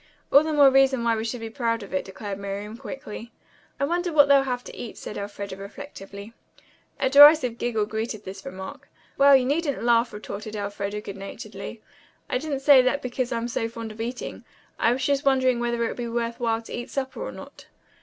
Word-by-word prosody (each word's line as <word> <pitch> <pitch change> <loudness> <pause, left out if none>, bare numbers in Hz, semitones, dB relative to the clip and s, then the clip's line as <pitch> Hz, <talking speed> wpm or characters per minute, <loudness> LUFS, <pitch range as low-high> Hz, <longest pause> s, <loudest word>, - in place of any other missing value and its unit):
"All 280 - +8
the 315 +1 -2
more 285 -3 +6
reason 265 -2 +4
why 230 -1 +2
we 220 - -3
should 230 +1 -4
be 225 - -5
proud 230 -2 -1
of 195 - -11
it," 185 - 0
declared 200 0 -7
Miriam 200 +2 -5
quickly. 240 -2 -8 0.5
"I 280 - +2
wonder 350 +3 -1
what 290 -2 +6
they'll 280 -1 +6
have 250 -2 -3
to - - -10
eat," 235 - -8
said - - -7
Elfreda 200 -1 -6
reflectively. 200 -1 -10 0.7
A - - +2
derisive 280 -3 +7
giggle 220 -3 0
greeted 220 0 -4
this 190 +1 -8
remark. 190 +1 -8 0.3
"Well, 280 0 +7
you 260 -1 +4
needn't 285 -1 -1
laugh," 235 0 +3
retorted 210 +1 -7
Elfreda 205 0 -4
good 200 -2 -8
naturedly. 195 0 -8 0.5
"I 250 - +1
didn't 285 -2 -3
say 275 -2 +7
that 255 +3 0
because 250 0 -2
I'm 235 0 -1
so 230 -1 -2
fond 230 -1 -7
of 220 +1 -8
eating. 245 +2 -5 0.4
I 230 - +4
was 255 +2 -1
just 280 0 +1
wondering 260 -3 +3
whether 235 -1 0
it - - -1
would - - -6
be 240 -1 -3
worth 235 0 -2
while 230 -1 0
to - - -10
eat 240 +2 -5
supper 265 -1 -4
or - - -4
not." - - -12
235 Hz, 210 wpm, -25 LUFS, 210-270 Hz, 0.7 s, All